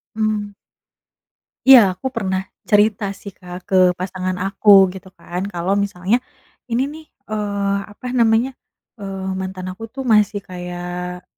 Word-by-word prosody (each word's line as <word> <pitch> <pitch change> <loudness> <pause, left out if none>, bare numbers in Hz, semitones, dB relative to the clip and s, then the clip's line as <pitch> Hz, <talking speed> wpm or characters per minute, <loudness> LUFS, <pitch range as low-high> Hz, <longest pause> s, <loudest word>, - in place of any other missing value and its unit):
Mmm. 215 -2 -1 1.1
Iya, 265 -1 +11 0.2
aku 185 - -4
pernah 190 -6 -1 0.3
cerita 210 0 +3 0.2
sih, 200 - -9
Kak, 180 -1 -10
ke 190 - 0 0.2
pasangan 185 0 -3
aku 195 +2 0 0.2
gitu 190 +1 -11
kan 175 +1 -5
kalau 175 +2 0
misalnya, 200 +3 0 0.5
"Ini 240 +3 +2
nih, 315 +1 -11 0.3
eee, 200 -2 -1
apa 205 - -14
namanya, 230 +3 +3 0.5
eee, 195 -1 -5
mantan 185 -1 -5
aku 195 +5 -10
tuh 265 +4 -7
masih 210 -4 +3
kayak," 180 0 -6
195 Hz, 130 wpm, -20 LUFS, 185-215 Hz, 1.1 s, Iya